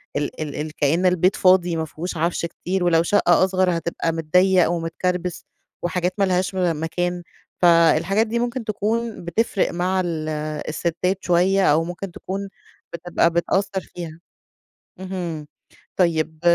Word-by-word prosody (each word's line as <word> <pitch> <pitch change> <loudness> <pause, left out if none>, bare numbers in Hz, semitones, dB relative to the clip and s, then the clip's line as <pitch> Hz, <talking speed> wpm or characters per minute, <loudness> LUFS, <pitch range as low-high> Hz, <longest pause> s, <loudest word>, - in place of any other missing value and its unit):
ال 145 0 -3
ال 150 0 -4
كأن 160 +6 +1
البيت 180 +1 +3
فاضي 180 -2 +4
ما 160 0 -1
فيهوش 170 +3 -6
عفش 170 +1 0
كتير، 180 +2 -3
ولو 165 -1 +3
شقّة 175 -1 +3
أصغر 185 -2 +1
هتبقى 165 0 -2
متضيق 180 +3 +3
ومتكربس، 175 +1 -2 0.4
وحاجات 180 +1 -1
ما 200 - +2
لهاش 185 0 0
و 180 -3 +1
مكان. 175 +3 -2 0.4
فالحاجات 170 +4 +4
دي 235 +2 -1
ممكن 240 +1 -2
تكون 220 +1 -2
بتفرق 200 +4 0
مع 180 +2 0
ال- 160 -2 -3 0.4
الستات 170 +4 -1
شويّة، 185 +2 +3
أو 160 +2 +3
ممكن 175 +3 -6
تكون 195 +3 -5 0.4
بتبقى 170 0 +1
بتأثر 190 +3 0
فيها. 165 -2 -9 0.8
اهم، 175 -5 -5 0.5
طيّب 160 -3 +1
175 Hz, 135 wpm, -22 LUFS, 165-190 Hz, 0.8 s, فاضي